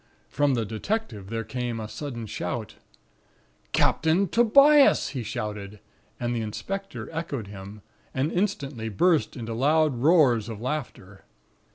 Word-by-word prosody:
"From 145 -2 +2
the 115 -2 -1
detective 110 - -3
there 115 0 -3
came 120 +1 -4
a 110 - -5
sudden 120 -2 -6
shout: 105 - -4 1.0
"'Captain 165 +5 +2
Tobias!' 275 - +5
he 130 - -4
shouted, 105 -2 -5 0.4
and 120 0 -1
the 115 - -1
inspector 195 - -5
echoed 160 -8 -4
him; 100 +1 -10 0.3
and 135 +4 -1
instantly 140 - -2
burst 160 - +2
into 115 -1 -5
loud 145 +2 +2
roars 130 -7 +4
of 110 -2 -6
laughter. 120 -7 -5
125 Hz, 130 wpm, -26 LUFS, 110-160 Hz, 1.0 s, Tobias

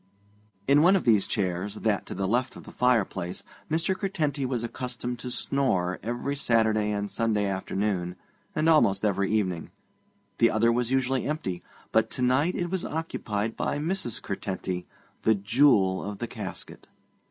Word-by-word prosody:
In 140 +2 +6
one 180 +4 +6
of 190 - +1
these 110 -5 +4
chairs, 95 +1 -1
that 105 -2 0
to - - -5
the 95 +1 -1
left 125 +5 0
of - - -10
the - - -11
fireplace, 100 -7 0 0.3
Mr. 165 +4 +1
Curtenty 155 -9 -1
was 125 -3 -2
accustomed 125 0 -4
to 125 - -5
snore 95 -10 0
every 120 +5 -2
Saturday 110 -5 +2
and 105 0 -1
Sunday 110 -3 +1
afternoon, 95 -2 -1 0.4
and 155 +1 +1
almost 110 -11 +4
every 100 -2 +1
evening. 95 -6 0 0.7
The 115 - +6
other 115 +2 +3
was 120 0 0
usually 130 0 +1
empty, 95 - -3 0.3
but - - +3
to 125 - 0
night 135 +8 +2
it 175 -1 -2
was 190 -2 -1
occupied 115 -9 -3
by - - -1
Mrs. 150 - -1
Curtenty, 95 -2 -4 0.3
the 110 - +4
jewel 100 -2 +3
of 100 0 -5
the 120 - -3
casket. 105 -5 -7
115 Hz, 160 wpm, -27 LUFS, 100-135 Hz, 0.7 s, In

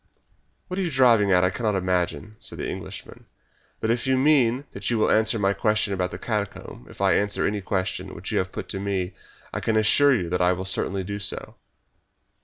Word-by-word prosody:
"What 185 +1 -4
you 185 - 0
are - - -2
driving 120 -8 +4
at 90 -1 +4
I 90 - +3
cannot 105 +1 -1
imagine," 90 +3 -1
said - - -8
the - - -3
Englishman, - - -8 0.5
"but 110 - 0
if 120 +2 -1
you 130 0 +3
mean 135 -2 +3
that - - -4
you 120 - +1
will 110 - +2
answer 110 +1 +3
my 100 -1 +2
question 105 0 +1
about 90 -1 -1
the - - -7
catacomb 100 - -4
if - - -12
I 95 -1 +4
answer 100 0 +1
any 105 0 -1
question 95 0 -3
which - - -6
you - - +1
may 95 - +1
put 95 - -7
to 95 - -3
me 95 -2 -2 0.4
I - - -2
can 110 -1 0
assure 135 +6 +5
you 90 -7 -1
that 90 +1 0
I 90 0 +4
will 95 +1 -5
certainly 95 0 +1
do 100 +2 -5
so." 100 - -4
100 Hz, 215 wpm, -24 LUFS, 95-115 Hz, 0.5 s, assure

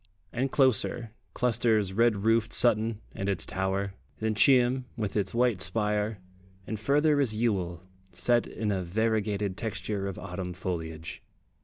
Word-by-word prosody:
And 130 +2 -1
closer, 120 -3 +2 0.2
clusters 110 -5 +2
red 110 -2 +2
roofed 115 0 +3
Sutton 110 -2 +3
and 95 +1 -3
its 95 - 0
tower, 95 +1 -2 0.2
then 110 0 -1
Cheam, 125 +2 +4
with 105 -4 -3
its 100 0 -1
white 120 -5 +2
spire, 105 +2 0 0.5
and 110 0 -4
further 145 +4 +3
is 115 -6 +1
Ewell, 95 -7 -1 0.3
set 100 +7 +2
in 105 -1 -3
a 95 -2 -1
variegated 105 0 -1
texture 105 -2 -3
of 95 - -5
autumn 90 -1 -5
foliage. 80 -3 -5
105 Hz, 140 wpm, -28 LUFS, 95-115 Hz, 0.5 s, Cheam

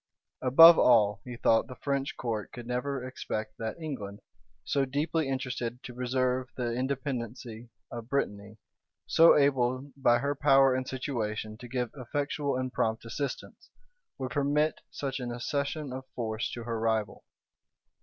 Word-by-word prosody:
Above 165 +6 +9
all, 105 -5 +4
he 125 -1 -6
thought 115 -1 +3
the 125 - -9
French 140 0 -2
court 110 -4 -3
could 120 - -9
never 125 +2 -2
expect 110 -4 -5
that 110 +7 -4
England, 105 -11 -6 0.4
so 140 - +1
deeply 145 +2 -1
interested 125 -2 -3
to 125 - -8
preserve 125 +1 -1
the 120 -2 -1
independency 125 -3 -4 0.2
of 120 0 -7
Brittany, 105 -6 -2 0.5
so 165 +1 +6
able 135 -1 +1
by 120 -3 +4
her 140 +4 -1
power 135 -2 +5
and 130 0 -2
situation 110 -5 -3
to 120 +2 -11
give 125 -1 -2
effectual 140 +1 -2
and 130 0 -3
prompt 110 +1 -1
assistance, 140 +5 -5 0.5
would 130 -2 -4
permit 145 +3 +1
such 135 -1 -4
an 125 -1 -4
accession 140 +3 -3
of 130 0 -7
force 110 -2 -2
to 120 - -6
her 115 -1 -3
rival. 110 -2 -1
125 Hz, 145 wpm, -29 LUFS, 115-140 Hz, 0.5 s, Above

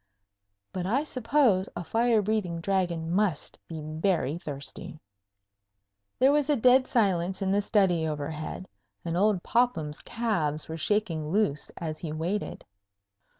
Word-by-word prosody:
But 180 -1 -3
I 260 +8 +1
suppose 250 -8 +2
a - - -4
fire 230 +2 +2
breathing 195 -5 -1
Dragon 170 -3 -1
must 185 -5 0
be 160 -2 -6
very 155 0 -1
thirsty. 145 0 -7 1.2
There 265 +2 +5
was 295 0 +2
a 295 - +4
dead 255 +1 +5
silence 190 -5 +1
in 190 - +1
the 200 +1 +3
study 185 -6 +2
overhead, 155 +4 -4 0.4
and 165 0 -2
old 200 0 +2
Popham's 170 -12 0
calves 160 -10 -1
were 160 - -5
shaking 165 -3 -1
loose 185 -6 0
as 155 -2 -4
he 160 - -5
waited. 170 +7 -3
185 Hz, 135 wpm, -28 LUFS, 160-215 Hz, 1.2 s, There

